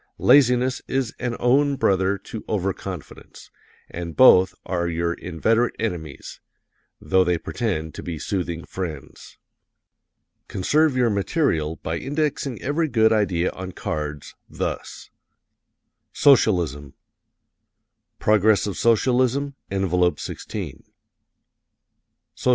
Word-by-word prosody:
Laziness 130 -1 +4
is 130 -3 -1
an 125 -2 -2
own 140 +3 +3
brother 95 -4 +1
to 110 +3 -9
Over 95 -2 -1
confidence, 90 -4 -10 0.4
and 85 -1 -7
both 95 -8 +6
are 85 -2 -1
your 85 0 -1
inveterate 110 +9 0
enemies, 85 -10 -5 0.6
though 95 +4 +2
they 90 -1 +1
pretend 80 -5 -3
to - - -7
be 85 -2 -5
soothing 85 0 -3
friends. 80 -7 -7 1.1
Conserve 145 +8 +1
your 120 -3 +3
material 100 - 0
by - - -2
indexing 145 -3 -2
every 155 +4 0
good 110 -4 +3
idea 90 -5 +1
on 95 0 -8
cards, 75 -3 -5 0.2
thus: - - -5 1.0
[HW: - - -16
Socialism 85 - +3 1.2
Progress 105 0 +3
of 105 - -2
S., - - -5 0.2
Env. 115 - 0
16 - - -6 1.5
S. - - -5
100 Hz, 105 wpm, -23 LUFS, 85-125 Hz, 1.5 s, both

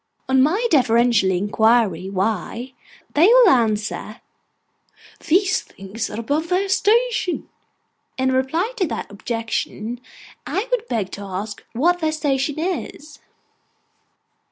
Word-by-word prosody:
On 265 0 +3
my 365 - +2
deferentially 235 - +3
inquiring 205 -2 +1
why, 225 +6 -2 0.4
they 320 +5 +5
will 485 -2 +7
answer, 215 - 0 1.0
'These 370 +4 +2
things 195 +4 -7
are 215 - -6
above 295 +8 -2
their 375 +2 +1
station.' 425 0 +1 0.7
In 260 0 +1
reply 320 - 0
to 370 - +1
that - - -5
objection, 230 +2 -4 0.4
I 410 +5 -2
would 480 -2 0
beg 210 - -2
to 200 - -7
ask 200 +2 -6
what 345 +9 +2
their 315 -2 0
station 290 -2 -1
is. 310 -3 -4
260 Hz, 115 wpm, -21 LUFS, 215-350 Hz, 1.0 s, will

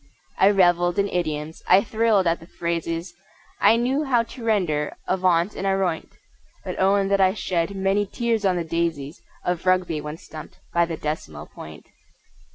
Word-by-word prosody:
I 195 - +6
revelled 175 -3 +3
in 200 0 +2
idioms; 155 -3 -3
I 190 +2 +6
thrilled 220 -3 +2
at 170 0 +1
the 165 - -14
phrases; 170 0 -3 0.5
I 210 +3 +5
knew 255 +5 0
how 250 -5 +2
to 235 +1 -11
render 175 -10 0
"avaunt" 185 0 +1
and 195 - -3
"aroint," 190 -4 0 0.6
But - - -5
own 195 +1 +3
that 200 0 +3
I 190 0 +3
shed 175 +2 -1
many 195 +1 +1
tears 230 0 -1
on 190 -2 +2
the 175 - -1
daisies 165 -3 -3 0.2
Of 180 0 -2
Rugby 180 -4 +2
when 150 +1 -6
stumped 155 -4 -11 0.2
by 170 0 +3
the 165 -1 -4
Decimal 80 - -5
Point! 80 0 -12
180 Hz, 165 wpm, -23 LUFS, 165-200 Hz, 0.6 s, I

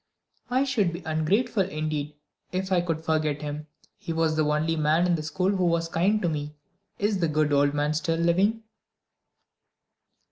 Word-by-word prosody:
"I 255 +2 +2
should 230 -10 +1
be 170 +1 -7
ungrateful 195 +9 +1
indeed 155 -4 -3 0.4
if 190 +1 -3
I 180 -2 +4
could 165 -2 -3
forget 155 -2 0
him. 150 +1 -5 0.3
He - - -5
was 160 -1 +1
the 155 - +2
only 150 +2 +1
person 155 +2 +2
in 180 - +2
the 160 - -3
school 180 +5 0
who 185 -3 +1
was 165 -1 +1
kind 190 +6 +2
to - - +2
me. 150 -2 -3 0.4
Is 205 -1 0
the 170 - +2
good 150 -1 +1
old 145 0 +3
man 145 +1 +1
still 165 +1 0
living?" 190 +7 +2
165 Hz, 175 wpm, -26 LUFS, 155-185 Hz, 0.4 s, I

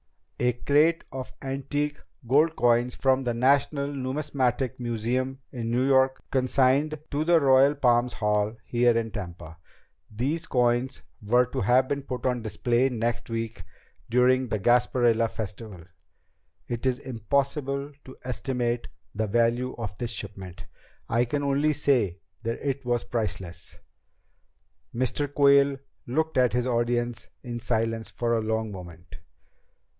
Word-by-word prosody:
A 125 0 +2
crate 150 +7 +2
of 130 -1 -6
antique 140 +2 -2 0.3
gold 155 +6 +3
coins 120 +1 +2
from 135 0 +2
the 120 -2 -1
National 140 +3 +2
Numismatic 130 -2 -1
Museum 120 +3 -2
in 115 -3 -4
New 125 +2 +1
York 130 -1 +3
consigned 135 +3 +2
to 145 +1 0
the 170 +1 +4
Royal 135 0 +5
Palms 120 -2 +2
Hall 105 +1 0
here 120 -1 +3
in 115 -1 -2
Tampa. 85 -5 -8 0.5
These 140 +10 -2
coins 125 +1 +1 0.2
were 120 +4 +3
to 125 - -4
have 125 +6 +3
been 140 +1 -2
put 130 -2 -6
on 125 -2 0
display 120 +3 +1
next 120 -1 -2
week 115 -3 -4 0.5
during 125 +2 +3
the 110 - -1
Gasparilla 120 0 +3
Festival. 105 -4 -7 0.8
It 120 +2 -2
is 125 -1 +1
impossible 140 +3 -2
to 130 - -12
estimate 125 -1 -2 0.3
the 110 +1 -1
value 120 +4 +1
of 105 -4 -5
this 120 - -2
shipment. 95 -5 -7 0.4
I 115 +2 +2
can 145 +4 -2
only 140 +2 +2
say 125 - +1 0.2
that 115 0 -3
it 135 0 -2
was 120 -1 0
priceless." 95 -7 -5 1.2
Mr. 130 +3 -1
Quayle 140 -1 +4 0.3
looked 155 +2 0
at 125 -2 +3
his 125 0 +1
audience 120 -1 -1
in 120 -2 -5
silence 115 -1 -1
for 120 -1 -1
a 115 - +1
long 110 0 -1
moment. 90 -2 -10
125 Hz, 135 wpm, -26 LUFS, 115-135 Hz, 1.2 s, Royal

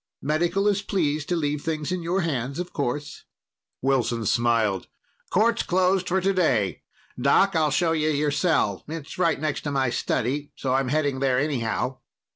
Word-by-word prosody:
Medical 170 +7 +1
is 205 -1 +2
pleased 155 -7 -1
to 175 - +1
leave 150 -3 -1
things 155 0 -3
in 185 -1 -1
your 175 +3 0
hands, 140 -5 -2
of 180 0 -5
course." 145 +1 -3 0.6
Wilson 125 -4 +1
smiled. 115 -3 +1 0.4
"Court's 225 +4 +2
closed 185 0 +1
for 190 +2 +2
today. 170 - +1 0.4
Doc, 170 +8 +4
I'll 155 -2 +3
show 165 +3 +1
you 155 -1 +1
your 150 0 +1
cell. 145 - +1
It's 160 +1 -7
right 165 -5 +2
next 150 -1 -2
to 145 - -3
my 135 -3 +1
study, 135 +5 -1
so 130 -2 -2
I'm 135 0 +1
heading 145 -1 0
there 130 -2 +2
anyhow." 130 -2 -1
150 Hz, 165 wpm, -25 LUFS, 130-175 Hz, 0.6 s, Doc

